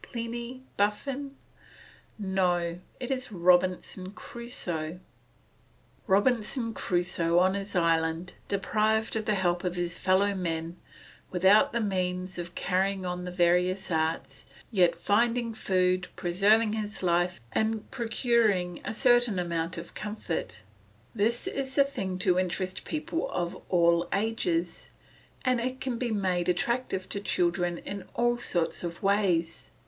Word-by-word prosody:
Pliny? 235 +2 -5
Buffon? 270 +7 -1 0.8
No; 180 -4 0 0.2
it 250 +1 -4
is 255 -3 -3
Robinson 185 +1 +2
Crusoe. 180 -10 -5 1.1
Robinson 230 +3 +2
Crusoe 175 -3 0
on 185 +1 +4
his 200 0 -5
island, 165 0 +1
deprived 215 +3 +1
of 220 -1 -1
the 215 - +2
help 175 -2 +1
of 180 -1 -1
his 175 0 -3
fellow 195 +2 +3
men, 165 -2 -3 0.5
without 190 +3 +5
the 235 - 0
means 185 -2 -2
of 175 0 -6
carrying 190 +1 0
on 180 0 -3
the 180 - -4
various 180 +2 +2
arts, 160 0 -1 0.3
yet 180 -6 +4
finding 230 +2 +1
food, 185 -3 +1
preserving 210 +5 +3
his 210 -2 -4
life, 175 0 +1
and 220 -1 -1
procuring 225 -7 +1
a - - -4
certain 240 -4 +4
amount 170 -1 -2
of 170 0 -8
comfort; 185 - -4 0.5
this 230 +2 +1
is 265 -1 -3
the 280 - +6
thing 235 -10 -4
to 180 0 +2
interest 185 +1 -2
people 320 +1 -2
of 175 -1 -2 0.2
all 170 -1 +3
ages, 185 -5 -1 0.6
and 255 -1 +3
it 255 +2 -3
can 255 -3 -3
be 245 - -1
made 185 -4 0
attractive 190 -1 0
to 200 - -2
children 175 -2 0
in 200 +3 -6
all 240 0 +2
sorts 175 -8 -1
of 170 +2 -5
ways. 190 -5 +1
190 Hz, 130 wpm, -28 LUFS, 175-225 Hz, 1.1 s, the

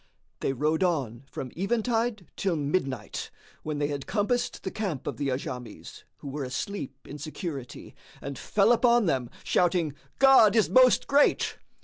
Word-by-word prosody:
They - - 0
rode 155 +5 0
on 135 -8 -1
from 130 -2 -6
eventide 225 +1 0
till 190 -3 0
midnight, 140 - -2 0.3
when 155 -1 -4
they 145 - 0
had 140 -2 -4
compassed 235 +4 -1
the 190 - -3
camp 190 - -3
of - - -4
the 140 - -2
Ajams, 125 -2 -6
who - - -10
were 140 +1 -4
asleep 135 +2 -4
in 145 - -8
security, 150 -4 -6 0.3
and 140 0 -6
fell 205 - +2
upon 240 -1 +4
them, 130 -7 0
shouting, 175 -4 +1 0.2
"God 265 -6 +7
is 220 - +3
Most 255 -1 +6
Great!" 285 +1 +2
165 Hz, 150 wpm, -27 LUFS, 140-215 Hz, 0.3 s, God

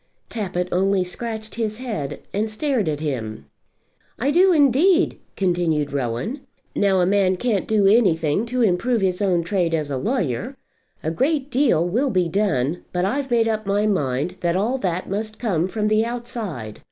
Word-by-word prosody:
Tappitt 180 -5 -2
only 190 +1 +2
scratched 220 +4 -6
his 220 -2 -2
head, 220 - -4
and 215 +2 0
stared 220 - 0
at 150 -1 -3
him. 110 - -4 0.7
"I 270 +4 +1
do 370 +4 +5
indeed," 320 +4 +3 0.2
continued 170 -6 0
Rowan. 140 - -2 0.3
"Now 195 -2 +3
a - - +3
man 190 -1 +2
can't 210 -1 -1
do 215 -2 +2
anything 195 -3 +3
to 250 +1 0
improve 225 +4 +1
his 185 0 0
own 180 -4 +2
trade 170 -2 0
as 150 -2 -3
a 135 - -1
lawyer. 210 - -2 0.5
A 160 - -1
great 280 - 0
deal 245 - +3
will 245 +10 +1
be 185 -6 +1
done; 165 -5 0
but 180 0 0
I've 270 +6 -1
made 230 -2 +3
up 215 -2 -2
my 205 +1 +1
mind 160 -3 -1
that 170 0 0
all 230 +8 0
that 180 -4 -2
must 215 +2 -3
come 185 -7 0
from 210 +2 -1
the 215 +1 +3
outside. 230 - -5
200 Hz, 170 wpm, -22 LUFS, 170-235 Hz, 0.7 s, do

